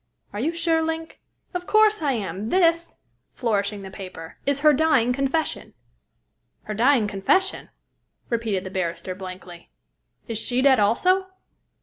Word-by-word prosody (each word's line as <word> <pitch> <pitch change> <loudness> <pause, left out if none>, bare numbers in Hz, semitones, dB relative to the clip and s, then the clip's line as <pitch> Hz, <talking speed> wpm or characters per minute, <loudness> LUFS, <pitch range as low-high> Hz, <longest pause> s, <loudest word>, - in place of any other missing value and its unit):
"Are 205 - -4
you 295 +8 0
sure, 330 -1 +1
Link?" 320 0 -4 0.3
"Of 360 0 -4
course 430 -2 +4
I 285 -3 +1
am. 210 -1 -4
This," 335 -1 +2 0.4
flourishing 205 -3 -1
the 190 - -9
paper, 185 -4 -10
"is 280 0 +1
her 305 0 +6
dying 265 -5 +3
confession." 275 +4 -2 0.9
"Her 215 - -5
dying 240 +1 +3
confession?" 210 - 0 0.6
repeated 225 -5 -1
the 185 - -7
barrister 185 0 -3
blankly. 185 -2 -10 0.6
"Is 225 -2 -2
she 250 +3 0
dead, 270 -4 +5
also?" 365 - +2
245 Hz, 135 wpm, -24 LUFS, 200-320 Hz, 0.9 s, her